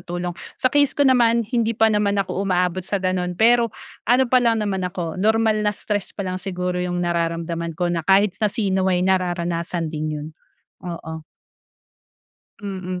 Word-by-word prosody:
tulong. 175 0 -4 0.2
Sa 255 - +1
case 285 -2 +3
ko 285 - +3
naman, 235 -3 +4
hindi 230 0 -1
pa 220 -1 +4
naman 205 -1 +1
ako 195 -1 -1
umaabot 180 -1 0
sa 200 +3 -2
gano'n. 185 -2 -1
Pero 235 +2 +4 0.4
ano 255 +2 +5
pa 255 0 +3
lang 225 -3 +2
naman 190 -2 -1
ako, 180 -1 -4
normal 220 0 +2
na 210 0 +1
stress 205 -3 -3
pa 200 - -3
lang 185 0 -3
siguro 180 -2 -3
yung 180 0 -2
nararamdaman 170 -1 -2
ko 175 -1 0
na 170 - 0
kahit 195 +3 +3
na 210 - +3
sino 190 -3 0
ay 180 -1 +1
nararanasan 175 -3 -1
din 155 0 -3
yun. 150 +1 -6 0.5
Oo. 165 -3 -6 1.4
Mm. 185 -2 -5
185 Hz, 170 wpm, -22 LUFS, 175-215 Hz, 1.4 s, ano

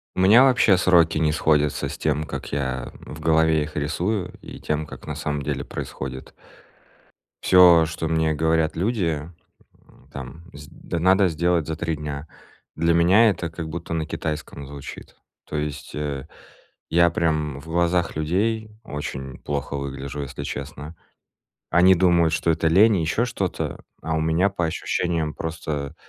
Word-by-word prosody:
У - - -1
меня 105 +7 +7
вообще 125 -7 +5
сроки 85 -4 +4
не 75 -1 +2
сходятся 75 -1 +1
с - - -6
тем, 75 0 0
как - - -6
я, 65 -3 -2
э, - - -16
в 75 - -9
голове 80 0 +3
их 75 +1 -7
рисую 90 +7 -1
и - - -10
тем, 75 0 -2
как - - -11
на - - -4
самом 75 -1 -3
деле - - -3
происходит. 65 0 -7 1.1
Всё, 90 -3 +7
что 80 0 -4
мне 80 -1 +1
говорят 80 +1 +1
люди, 85 -6 -1 0.6
м, - - -22
там 70 +5 -9
сд 75 0 -11 0.3
надо 95 +3 +4
сделать 85 -1 +1
за 80 0 -3
три 85 0 -2
дня. 75 0 -6 0.5
Для 85 +1 +2
меня 95 +7 +5
это 85 -4 -4
как 80 0 -6
будто 85 +1 -5
на 80 -1 -2
китайском 75 -2 -5
звучит. 70 0 -10 0.3
То - - -5
есть, 75 0 -4
э, 75 -2 -4 0.6
я 85 +1 +4
прям 75 -4 -1
в 75 - -15
глазах 85 0 +1
людей 105 +8 0
очень 70 -5 -6
плохо 70 -1 -4
выгляжу, 70 +1 -5
если 70 - -6
честно. 75 +3 -7 0.7
Они 90 +3 +6
думают, 85 -3 +3
что 80 +1 +1
это 80 0 +2
лень 100 +6 +5
и - - 0
еще 95 +9 +1
что-то, 100 -7 -3 0.2
а 80 +1 -2
у - - 0
меня 80 +5 +2
по 90 -3 -1
ощущениям 80 -1 -1
просто 75 -3 -4
80 Hz, 160 wpm, -23 LUFS, 75-85 Hz, 1.1 s, меня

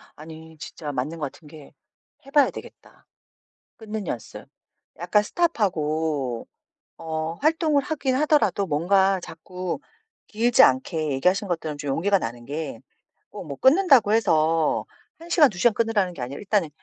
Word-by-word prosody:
아니 160 +1 -12
진짜 155 -2 -7
맞는 145 +5 -3
것 145 -3 -3
같은 160 - -18
게 150 -1 -14 0.5
해봐야 280 +1 +3
되겠다, - - -13 0.7
끊는 215 -3 -6
연습. 115 - -7 0.5
약간 180 +5 +2
스톱하고 160 - -1 0.5
어 160 0 -4
활동을 310 - +1
하긴 285 -3 -2
하더라도 295 -8 +2
뭔가 190 +5 +2
자꾸 180 +4 -6 0.5
길지 235 +3 +3
않게. 145 +3 +2
얘기하신 185 +9 +1
것들은 160 -4 -3
좀 145 -1 -4
용기가 195 +7 +2
나는 120 -2 -6
게 145 -2 -5 0.5
꼭 - - -9
뭐 140 -2 -6
끊는다고 265 - +4
해서 160 -7 +2 0.3
1 335 +1 -13
시간, 310 -4 +6
2 190 - -12
시간 240 +4 +4
끊으라는 210 -5 0
게 145 - -11
아니라 130 +3 -5
일단은 200 -5 0
175 Hz, 290 characters per minute, -24 LUFS, 155-225 Hz, 0.7 s, 시간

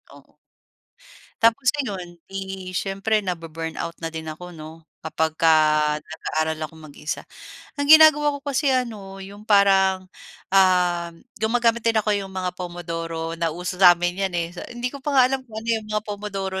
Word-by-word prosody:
oo. - - -20 1.1
Tapos 230 +3 +3
ayon, 185 -7 -6
'di 190 -1 -6
siyempre 195 +3 0
nabu-burnout 165 -1 -5
na 165 - -2
din 160 0 -6
ako 180 +3 -9
'no, 160 +1 -11 0.2
kapagka 160 0 +1 0.5
nag-aaral 155 0 -3
akong 160 +1 -16
mag-isa. 150 +1 -5 0.6
Ang 285 - -1
ginagawa 295 -2 +7
ko - - -21
kasi 285 0 0
ano 215 -6 -3
yung 205 +2 -12
parang 195 -2 +4 0.5
ah, 180 -3 +3 0.3
gumagamit 230 +1 +2
din 230 -1 +2
ako 210 0 +1
yung 195 -1 -4
mga 185 -1 -3
Pomodoro- 165 -2 -5
nauso 175 +2 -3
sa 180 -2 +9
amin 175 +2 -2
'yan, 185 - -7
eh. 170 -1 -1
So, 175 - -7
hindi 240 +1 -3
ko 280 - -8
pa 280 +1 -2
nga 260 - +8
alam 270 - 0
kung 220 - -11
ano 230 - -8
yung 215 - -13
mga 215 0 -1
Pomodoro 200 -2 -4
190 Hz, 160 wpm, -23 LUFS, 170-220 Hz, 1.1 s, sa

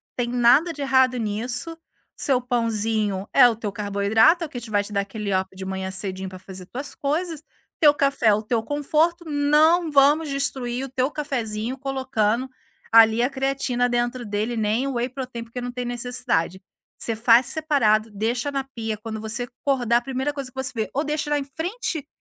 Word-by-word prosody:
tem 240 -1 -1
nada 250 +7 +4
de 290 - -8
errado 260 -2 +3
nisso, 240 +9 -3 0.4
seu 265 -3 +2
pãozinho 220 -5 -1
é 255 -3 +8
o 230 - -2
teu 215 -2 -4
carboidrato, 210 - +2
o - - -10
que 245 - -7
te 230 - -9
vai 205 - +3
te 205 +1 -8
dar 200 - +1
aquele 200 -1 -3
up 190 0 -2
de 190 0 -7
manhã 190 0 -4
cedinho 190 0 -4
para 185 0 -10
fazer 185 -1 -10
tuas 275 +3 -7
coisas, 310 +2 -2 0.4
teu 295 -2 +7
café 275 -4 +1
é 210 - +7
o 210 - 0
teu 225 +1 -1
conforto, 310 +6 0
não 310 +3 +3
vamos 290 +2 +4
destruir 265 -2 -2
o - - -9
teu 260 +2 -1
cafezinho 245 -5 -3
colocando 260 -3 -1 0.4
ali 225 0 +7
a 245 - +2
creatina 265 -2 -1
dentro 240 0 -1
dele, 210 +3 -2
nem 220 +4 0
o 275 - -3
whey 240 +1 -1
protein, 255 -3 -6
porque 230 +2 -8
não 245 0 -4
tem 245 0 -4
necessidade. 240 -7 -1 0.4
Você 230 - -1
faz 230 +2 +5
separado, 230 -9 +2
deixa 230 +6 -1
na 275 -1 -2
pia, 225 -5 -5
quando 220 0 -6
você 235 +3 -3 0.2
acordar, 245 -4 +2
a - - 0
primeira 265 +3 -2
coisa 275 -2 -5
que 260 - -27
você 265 -1 -1
vê, 220 -4 -2
ou 285 - 0
deixa 300 0 -2
lá 295 - +2
em 285 - -2
frente 320 - -4
245 Hz, 195 wpm, -23 LUFS, 220-275 Hz, 0.4 s, é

